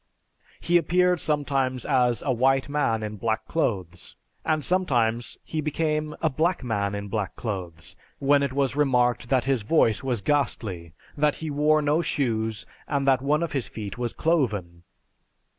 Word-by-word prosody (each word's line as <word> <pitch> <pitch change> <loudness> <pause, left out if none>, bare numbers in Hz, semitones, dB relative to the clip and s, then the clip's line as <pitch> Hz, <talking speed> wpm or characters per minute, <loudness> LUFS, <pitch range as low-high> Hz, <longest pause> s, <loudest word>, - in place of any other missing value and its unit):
He 175 0 +3
appeared 180 0 +2
sometimes 135 -4 0
as 125 -4 +2
a 135 - 0
white 130 +2 +2
man 140 -7 0
in 105 0 -5
black 110 +1 -1
clothes, 95 - -3 0.3
and 155 -2 0
sometimes 120 -11 +1
he 155 - -3
became 150 0 -1
a - - +4
black 165 +5 0
man 105 -4 -1
in 100 0 -5
black 105 -1 -3
clothes, 90 - -6 0.2
when 140 +1 +3
it 140 -1 0
was 135 -1 0
remarked 125 -4 +2
that 130 -2 +2
his 135 -3 +1
voice 115 0 +2
was 125 -5 -1
ghastly, 100 - -1 0.2
that 150 0 +2
he 160 -1 -5
wore 150 +1 +3
no 150 +3 +2
shoes, 110 -8 -1 0.2
and 140 -1 -1
that 130 -1 +4
one 150 +4 +1
of 170 - -3
his 135 -4 -1
feet 105 0 -7
was 120 -2 -1
cloven. 105 - -1
130 Hz, 160 wpm, -25 LUFS, 110-150 Hz, 0.3 s, a